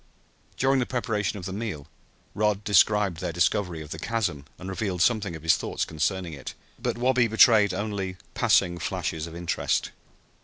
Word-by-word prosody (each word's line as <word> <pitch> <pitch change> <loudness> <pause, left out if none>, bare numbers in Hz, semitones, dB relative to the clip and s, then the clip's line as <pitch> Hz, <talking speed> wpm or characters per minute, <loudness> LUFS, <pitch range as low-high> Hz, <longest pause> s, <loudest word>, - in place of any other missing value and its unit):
During 135 +1 +3
the 125 - -1
preparation 110 -4 -1
of 90 - -7
the 95 - -4
meal 100 -9 -4 0.5
Rod 105 0 0
described 105 -2 +3
their 90 -2 -2
discovery 85 -1 0
of 75 - -13
the 80 - -5
chasm 100 -9 -2
and 95 - -9
revealed 95 -1 -1
some 120 - +4
of 85 -6 -6
his 80 0 +4
thoughts - - -2
concerning 85 +2 -2
it, 70 -3 -8 0.3
but - - -1
Wabi 125 0 +3
betrayed 110 -2 +6
only 95 -1 -3 0.2
passing 90 -2 +2
flashes 80 0 -3
of 85 - -10
interest. 85 0 -1
95 Hz, 165 wpm, -26 LUFS, 85-110 Hz, 0.5 s, betrayed